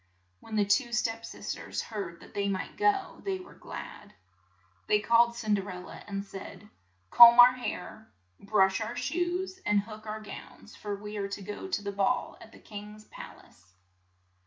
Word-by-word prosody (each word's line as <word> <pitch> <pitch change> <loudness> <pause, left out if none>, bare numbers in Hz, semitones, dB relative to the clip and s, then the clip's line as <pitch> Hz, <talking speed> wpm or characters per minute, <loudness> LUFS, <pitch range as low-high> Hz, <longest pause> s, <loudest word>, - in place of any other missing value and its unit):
When 220 - -8
the 210 -1 +3
two 240 +5 +2
s£ep 230 -1 -1
sis - - -5
ters - - -5
heard 195 -6 -6
that - - -15
they 200 0 0
might 190 -1 -3
go, 405 -2 +1
they 390 -1 -1
were 365 - -12
glad. 205 - -10 0.7
They 210 - +4
called 235 +2 +4
Cin 220 -3 -1
der 200 -1 -1
el 180 0 -6
la, - - -10
and 200 0 -4
said, 195 +1 -10 0.4
"Comb 235 0 +10
our 245 +1 +10
hair, 230 -3 -6 0.3
brush 195 0 +2
our 225 +2 -3
shoes, 355 +5 -2
and 210 -1 +3
hook 215 +1 -11
our 215 +1 -4
gowns, 215 0 -11
for 205 -1 -4
we 210 +1 -7
are 200 -1 -2
to 200 0 -6
go 205 - -6
to 360 - -2
the 200 - -3
ball 200 +6 0
at 220 - -13
the - - -15
king's 210 0 -10
pal - - -11
ace." 95 0 -25
215 Hz, 185 wpm, -29 LUFS, 200-240 Hz, 0.7 s, Comb